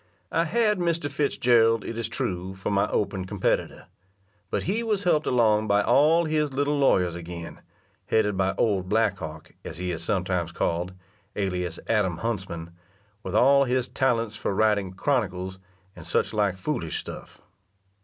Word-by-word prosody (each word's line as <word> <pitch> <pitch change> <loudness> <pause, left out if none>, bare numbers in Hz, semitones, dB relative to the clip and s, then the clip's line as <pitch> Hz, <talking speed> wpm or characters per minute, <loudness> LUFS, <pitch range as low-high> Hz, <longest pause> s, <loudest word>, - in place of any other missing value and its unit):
I 165 - +2
had 210 +1 +2
Mr. 170 -4 0
Fitzgerald, 120 -6 +3
it 115 - -5
is 115 -1 -3
true, 95 -3 -3
for 95 +2 -3
my 100 0 +2
open 95 -2 -1
competitor, 95 0 -1 0.6
but - - -1
he 210 +6 0
was 215 -4 -1
helped 160 -4 +2
along 110 -3 +3
by 100 0 +3
all 160 +8 +4
his 155 -2 0
little 145 +2 0
lawyers 90 -10 +3
again, 85 0 -8 0.5
headed 105 -2 +2
by 95 0 0
old 95 -5 +1
Black 105 -2 +2
Hawk, 75 0 -8
as 80 - -7
he 90 0 -3
is 85 -1 -5
sometimes 90 -3 -1
called, 85 +2 -1 0.4
(alias) 90 -4 -2
Adam 95 -6 +1
Huntsman, 95 -7 -4 0.5
with 95 -1 -5
all 140 +4 +5
his 125 0 0
talents 115 -5 0
for 100 - -2
writing 105 -3 +2
"Chronicles," 95 -6 -1 0.4
and 85 - -10
such 85 - 0
like 100 -3 +1
foolish 95 - -3
stuff. - - -9
105 Hz, 155 wpm, -26 LUFS, 90-135 Hz, 0.6 s, all